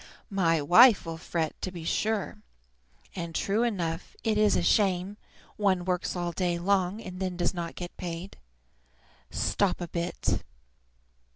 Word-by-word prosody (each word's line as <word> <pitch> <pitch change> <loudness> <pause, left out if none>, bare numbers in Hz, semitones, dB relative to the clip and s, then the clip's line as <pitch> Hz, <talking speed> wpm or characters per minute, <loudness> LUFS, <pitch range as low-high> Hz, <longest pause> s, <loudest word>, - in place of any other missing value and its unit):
My 165 -6 +2
wife 215 - +7
will 165 0 -5
fret, 160 -2 -3
to 185 - -3
be 170 -3 -8
sure. 210 +4 -1 0.7
And, 170 -2 -5
true 205 +3 +1
enough, 180 -8 -2
it 220 -1 +1
is 210 -1 +4
a - - +1
shame; 195 -1 +2 0.4
one 190 -4 +1
works 180 0 -1
all 175 -1 -2
day 175 0 0
long, 190 +2 +1
and 185 -4 -8
then 185 -2 -2
does 175 +1 0
not 170 -2 -5
get 175 -1 -7
paid. 175 +2 -6 0.9
Stop 200 -3 0
a 175 - -4
bit! 170 +1 -2
180 Hz, 150 wpm, -28 LUFS, 170-200 Hz, 0.9 s, wife